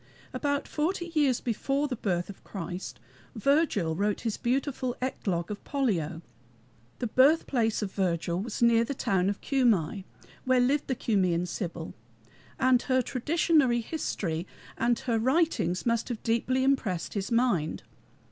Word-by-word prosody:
About 285 Hz, -1 st, -1 dB
forty 345 Hz, +3 st, -2 dB
years 285 Hz, -6 st, +2 dB
before 275 Hz, +5 st, -1 dB
the 260 Hz, -, -3 dB
birth 175 Hz, -5 st, -1 dB
of 200 Hz, -, -11 dB
Christ, 180 Hz, -1 st, -6 dB, 0.4 s
Virgil 225 Hz, -, +2 dB
wrote 205 Hz, +3 st, 0 dB
his 225 Hz, -3 st, -1 dB
beautiful 255 Hz, 0 st, -1 dB
Eclogue 190 Hz, -9 st, -2 dB
of 205 Hz, -, -6 dB
Pollio. 175 Hz, -, -1 dB, 0.7 s
The -, -, -3 dB
birthplace 255 Hz, -3 st, +3 dB
of 195 Hz, -, -4 dB
Virgil 175 Hz, -3 st, -1 dB
was 225 Hz, +3 st, -3 dB
near 230 Hz, -1 st, +5 dB
the 275 Hz, +4 st, -4 dB
town 190 Hz, -5 st, +1 dB
of 200 Hz, -, -4 dB
Cumæ, 210 Hz, -, +1 dB, 0.4 s
where 255 Hz, 0 st, +3 dB
lived 275 Hz, +4 st, +2 dB
the 260 Hz, -, 0 dB
Cumæan 180 Hz, -7 st, +1 dB
Sibyl, 170 Hz, -3 st, -5 dB, 0.7 s
and 255 Hz, -2 st, +4 dB
her 255 Hz, -1 st, +1 dB
traditionary 275 Hz, -1 st, +2 dB
history 185 Hz, -, -3 dB, 0.3 s
and 235 Hz, 0 st, +1 dB
her 240 Hz, -4 st, 0 dB
writings 260 Hz, -, +1 dB
must 230 Hz, 0 st, 0 dB
have 235 Hz, -3 st, -5 dB
deeply 250 Hz, +3 st, +1 dB
impressed 225 Hz, -11 st, 0 dB
his 200 Hz, +2 st, -3 dB
mind. 230 Hz, -10 st, +1 dB
235 Hz, 140 wpm, -28 LUFS, 190-265 Hz, 0.7 s, near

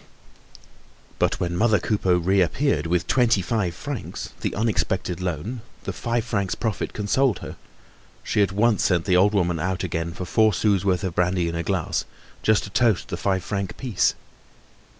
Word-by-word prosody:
But -, -, +1 dB
when 85 Hz, -1 st, -1 dB
mother 110 Hz, +3 st, +3 dB
Coupeau 95 Hz, -4 st, +1 dB
reappeared 95 Hz, -, +1 dB
with 85 Hz, +1 st, +1 dB
twenty 115 Hz, -5 st, +3 dB
five 95 Hz, -4 st, -1 dB
francs, 140 Hz, +2 st, -6 dB
the -, -, -2 dB
unexpected 95 Hz, -4 st, -1 dB
loan, 90 Hz, -, -3 dB, 0.2 s
the -, -, -4 dB
five 120 Hz, -1 st, -1 dB
francs 100 Hz, -5 st, -1 dB
profit 110 Hz, -4 st, -2 dB
consoled 110 Hz, +2 st, +1 dB
her; -, -, -7 dB, 0.7 s
she -, -, +1 dB
at 100 Hz, -2 st, +2 dB
once 105 Hz, +2 st, +2 dB
sent 90 Hz, -3 st, +2 dB
the 95 Hz, -2 st, +3 dB
old 100 Hz, +3 st, +4 dB
woman 85 Hz, -4 st, +1 dB
out 95 Hz, +3 st, -2 dB
again 85 Hz, -1 st, -2 dB
for 90 Hz, -, -5 dB
four 110 Hz, +3 st, +3 dB
sous' 100 Hz, -2 st, +2 dB
worth 95 Hz, -2 st, +1 dB
of 95 Hz, -3 st, -2 dB
brandy 90 Hz, 0 st, +1 dB
in 85 Hz, -, -3 dB
a 85 Hz, -, -1 dB
glass, 90 Hz, -1 st, -1 dB, 0.4 s
just 110 Hz, -1 st, +3 dB
to 100 Hz, -, -8 dB
toast 115 Hz, -3 st, +2 dB
the -, -, -2 dB
five 95 Hz, -2 st, 0 dB
franc 100 Hz, -1 st, -3 dB
piece. 120 Hz, -8 st, +1 dB
95 Hz, 170 wpm, -24 LUFS, 90-110 Hz, 0.7 s, old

